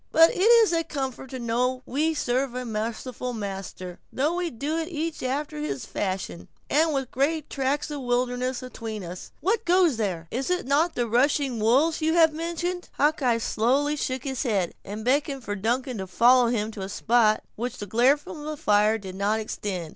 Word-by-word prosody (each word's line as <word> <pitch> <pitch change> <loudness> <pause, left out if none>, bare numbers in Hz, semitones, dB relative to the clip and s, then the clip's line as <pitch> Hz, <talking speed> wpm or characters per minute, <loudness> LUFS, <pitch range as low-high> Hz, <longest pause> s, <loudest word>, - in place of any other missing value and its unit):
But 325 +1 +7
it - - -5
is 450 -1 +6
a 330 0 +2
comfort 265 -4 -5
to 260 - -5
know 250 +2 -1
we 310 +4 0
serve 255 -1 0
a 250 0 -3
merciful 230 +3 -4
Master, 195 -4 -6
though 295 +5 0
we 355 -1 -1
do 290 +4 -3
it 325 - -3
each 325 -1 -3
after 260 - -2
his 140 -3 -3
fashion, 185 - -4 0.2
and 315 +2 +3
with 270 -3 -2
great 300 +3 0
tracts 280 +2 -1
of 290 -2 -4
wilderness 250 +1 -1
atween 225 -4 -6
us—what 315 - -3
goes 350 - +3
there?" 180 -7 -2
"Is 265 +6 -2
it 360 -4 0
not 300 +6 +2
the 240 -1 0
rushing 270 +4 +2
of 240 - -4
the 215 - -1
wolves 300 +8 +3
you 320 +1 +2
have 325 -2 +5
mentioned?" 345 +2 -3
Hawkeye 280 -5 +2
slowly 265 +7 +1
shook 260 -3 -3
his 265 -3 -3
head, 200 -9 0
and 210 +2 -7
beckoned 275 0 +1
for 205 -2 -3
Duncan 240 +3 -1
to 190 - -4
follow 240 +6 +5
him 220 -2 -1
to 210 - -8
a 190 - -4
spot 220 +1 +3
to - - -38
which 245 +2 -3
the 205 - -5
glare 245 +8 +4
from 295 +1 -9
the 305 0 -4
fire 210 -2 +3
did 190 -3 -8
not 200 +3 0
extend. 195 -6 -4
255 Hz, 200 wpm, -26 LUFS, 220-300 Hz, 0.2 s, But